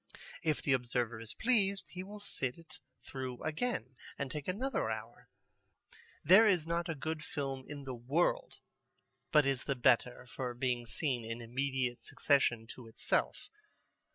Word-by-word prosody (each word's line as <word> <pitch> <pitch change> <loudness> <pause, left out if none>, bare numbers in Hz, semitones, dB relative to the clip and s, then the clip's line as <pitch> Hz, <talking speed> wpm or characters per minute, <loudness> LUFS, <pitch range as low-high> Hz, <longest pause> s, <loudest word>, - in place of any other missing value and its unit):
If 155 -2 0
the 140 - +3
observer 120 -2 0
is 115 -1 -7
pleased, 200 -5 +2
he 180 - -6
will 205 +2 -9
sit 130 -10 -3
it 165 -2 -13 0.2
through 130 -2 -5
again 150 - -2 0.2
and 140 -1 -3
take 150 -2 -5
another 215 - 0
hour. 110 +1 -6 0.9
There 195 +8 +8
is 180 -6 +3
not 170 +1 -1
a 160 - -1
good 155 +2 -3
film 135 -3 -4
in 145 -1 -6
the 130 -1 -5
world 130 +8 0 0.8
but 150 -2 +6
is 135 -3 0
the 140 - 0
better 125 -1 +3
for 125 0 -4
being 120 -1 -1
seen 125 +1 0
in 115 +1 -4
immediate 125 0 -1
succession 120 -4 +2
to 125 -3 -12
itself. 110 - 0
135 Hz, 155 wpm, -34 LUFS, 120-160 Hz, 0.9 s, There